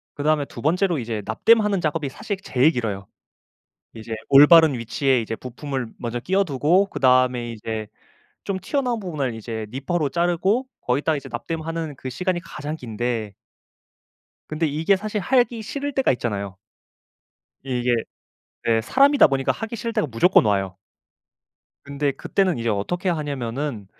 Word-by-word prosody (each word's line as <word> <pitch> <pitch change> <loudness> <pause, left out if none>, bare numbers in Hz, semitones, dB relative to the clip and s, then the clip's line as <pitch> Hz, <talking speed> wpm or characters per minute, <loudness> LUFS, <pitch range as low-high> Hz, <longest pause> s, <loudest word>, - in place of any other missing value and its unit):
그다음에 150 0 +1
2 - - -10
번째로 175 +1 +1
이제 115 -3 -4
납땜하는 210 - +3
작업이 155 -3 -1
사실 205 +9 -4
제일 135 +1 +3
길어요. 105 - -3 0.9
이제 110 0 -6
올바른 150 +2 +8
위치에 125 +2 +1
이제 115 0 -4
부품을 130 +1 -5
먼저 120 0 -3
끼워두고 180 +2 +2
그다음에 125 -6 +2
이제 110 -1 -5 0.6
좀 195 -2 -2
튀어나온 245 - -1
부분을 150 - -3
이제 110 0 -5
니퍼로 140 +5 -1
자르고 175 - +1
거기다 145 +5 0
이제 140 - -7
납땜하는 165 -2 -4
그 130 - -7
시간이 180 +7 -2
가장 155 -3 -6
긴데 115 -4 -3 1.1
근데 155 +1 -1
이게 160 +6 +2
사실 210 +2 -3
하기 240 +1 +1
싫을 280 +6 -4
때가 270 0 +2
있잖아요. 100 -6 -3 1.1
이게 125 -2 0 0.7
네 115 -1 +3
사람이다 275 - +5
보니까 135 -1 +1
하기 225 +1 -5
싫을 230 +1 -4
때가 155 - 0
무조건 120 +7 +4
와요. 95 -2 0 1.1
근데 140 0 -1
그때는 185 +1 0
이제 115 0 -2
어떻게 145 - -1
하냐면은 140 - -3
145 Hz, 330 characters per minute, -23 LUFS, 120-180 Hz, 1.1 s, 올바른